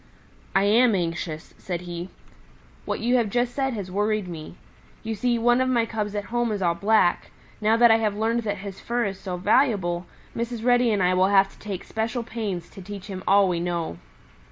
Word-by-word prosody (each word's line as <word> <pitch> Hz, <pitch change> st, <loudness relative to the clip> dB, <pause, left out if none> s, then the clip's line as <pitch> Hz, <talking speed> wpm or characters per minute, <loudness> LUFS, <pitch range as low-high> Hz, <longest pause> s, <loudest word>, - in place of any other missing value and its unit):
"I 195 Hz, -, +4 dB
am 225 Hz, +2 st, +4 dB
anxious," 165 Hz, -2 st, -3 dB
said 175 Hz, -2 st, -4 dB
he. 175 Hz, 0 st, -6 dB, 0.8 s
"What -, -, -3 dB
you 245 Hz, +3 st, +3 dB
have 230 Hz, -4 st, +1 dB
just 245 Hz, +2 st, 0 dB
said 270 Hz, -2 st, -1 dB
has 195 Hz, -3 st, -5 dB
worried 210 Hz, 0 st, 0 dB
me. 165 Hz, -1 st, -8 dB, 0.5 s
You 225 Hz, 0 st, -3 dB
see, 235 Hz, +3 st, 0 dB
one 240 Hz, +2 st, +3 dB
of 260 Hz, -, +1 dB
my 235 Hz, -3 st, +2 dB
cubs 215 Hz, -2 st, -3 dB
at 205 Hz, -, -2 dB
home 240 Hz, -1 st, +1 dB
is 205 Hz, -, -2 dB
all 175 Hz, -3 st, +2 dB
black. 200 Hz, -1 st, +2 dB, 0.3 s
Now 220 Hz, +2 st, +3 dB
that 235 Hz, -1 st, +7 dB
I 225 Hz, -, +6 dB
have 210 Hz, -2 st, -1 dB
learned 225 Hz, +2 st, +1 dB
that 205 Hz, -2 st, -2 dB
his 195 Hz, 0 st, -8 dB
fur 240 Hz, 0 st, -1 dB
is 195 Hz, -1 st, -4 dB
so 185 Hz, -2 st, -5 dB
valuable, 190 Hz, -4 st, +1 dB, 0.3 s
Mrs. 235 Hz, -1 st, -3 dB
Reddy 245 Hz, -1 st, +4 dB
and 200 Hz, -3 st, +1 dB
I 180 Hz, +1 st, +3 dB
will 185 Hz, +1 st, +4 dB
have 195 Hz, 0 st, +4 dB
to -, -, -21 dB
take 200 Hz, -4 st, -5 dB
special 225 Hz, +2 st, -3 dB
pains 205 Hz, -7 st, -4 dB
to 195 Hz, -, -11 dB
teach 195 Hz, 0 st, -8 dB
him 190 Hz, -2 st, -7 dB
all 200 Hz, 0 st, +5 dB
we 175 Hz, -2 st, 0 dB
know." 170 Hz, -, -3 dB
205 Hz, 210 wpm, -25 LUFS, 185-230 Hz, 0.8 s, that